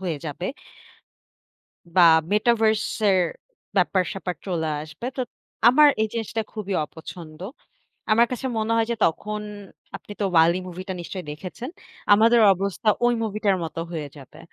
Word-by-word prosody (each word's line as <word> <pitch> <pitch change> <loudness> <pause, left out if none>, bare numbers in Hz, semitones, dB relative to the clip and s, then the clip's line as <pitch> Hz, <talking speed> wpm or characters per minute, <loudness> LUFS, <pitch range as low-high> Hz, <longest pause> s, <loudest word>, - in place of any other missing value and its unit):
হয়ে 175 -5 -2
যাবে। 155 +4 -4 1.5
বা 180 - +7 0.3
Metaverse 220 0 +2 0.2
এর 190 - +4 0.6
ব্যাপার-স্যাপার 185 0 0
চলে 165 -4 -1
আসবে। 155 +10 -8
তো 260 - -2 0.5
আমার 295 +4 +7
এই 220 - 0
জিনিসটা 225 0 -2
খুবই 205 -3 -4
অপছন্দ। 160 0 -11 0.7
আমার 230 +2 +5
কাছে 250 +1 -3
মনে 220 +1 0
হয় 225 -1 +2
যে, - - +1
তখন 210 +6 -1 0.6
আপনি - - -11
তো - - +1
'WALL·E' 170 +3 +5
মুভিটা 185 +2 -6
নিশ্চয়ই 180 0 -7
দেখেছেন, 185 - -7 0.4
আমাদের 230 +3 +5
অবস্থা 200 +3 -2 0.2
ওই 240 - +3
মুভিটার 210 -2 0
মতো 165 +1 -5
হয়ে 155 -4 -4
যাবে। 135 -2 -14
195 Hz, 135 wpm, -24 LUFS, 170-220 Hz, 1.5 s, বা